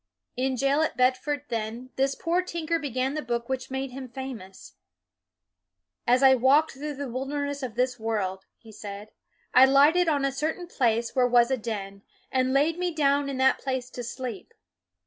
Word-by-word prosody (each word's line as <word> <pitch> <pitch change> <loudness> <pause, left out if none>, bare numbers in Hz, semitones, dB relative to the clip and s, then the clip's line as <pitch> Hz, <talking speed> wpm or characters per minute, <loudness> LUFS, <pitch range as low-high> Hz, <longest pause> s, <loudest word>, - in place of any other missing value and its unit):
In 260 +1 -1
jail 275 +3 +2
at 315 - -1
Bedford, 260 +3 +1
then, 230 +2 -4
this 270 +1 +1
poor 345 +2 0
tinker 335 -2 -2
began 265 -2 -2
the 305 - -2
book 235 -3 -3
which 260 -1 -3
made 265 0 -3
him 260 0 -8
famous. 245 -7 -8 0.7
" 90 0 -56
As 250 +3 +4
I 265 -1 +8
walked 265 +5 +4
through 290 +2 -6
the 280 0 -5
wil 255 +2 -4
derness 285 0 -3
of 245 -4 -5
this 250 0 0
world," 200 -4 -2
he 225 - -15
said, 205 0 -9 0.2
" - - -40
I 255 +1 +8
lighted 295 +6 +5
on 285 -3 +2
a 275 - +1
certain 315 +6 -3
place 235 -8 0
where 250 -1 +4
was 240 +1 +4
a 265 - +2
den, 200 -4 -5 0.3
and 260 0 +1
laid 300 +5 +2
me 360 -1 0
down 285 -2 +1
in 270 - -4
that 265 0 +3
place 260 -2 -3
to 245 - -6
sleep." 240 -4 -7
260 Hz, 190 wpm, -26 LUFS, 235-280 Hz, 0.7 s, I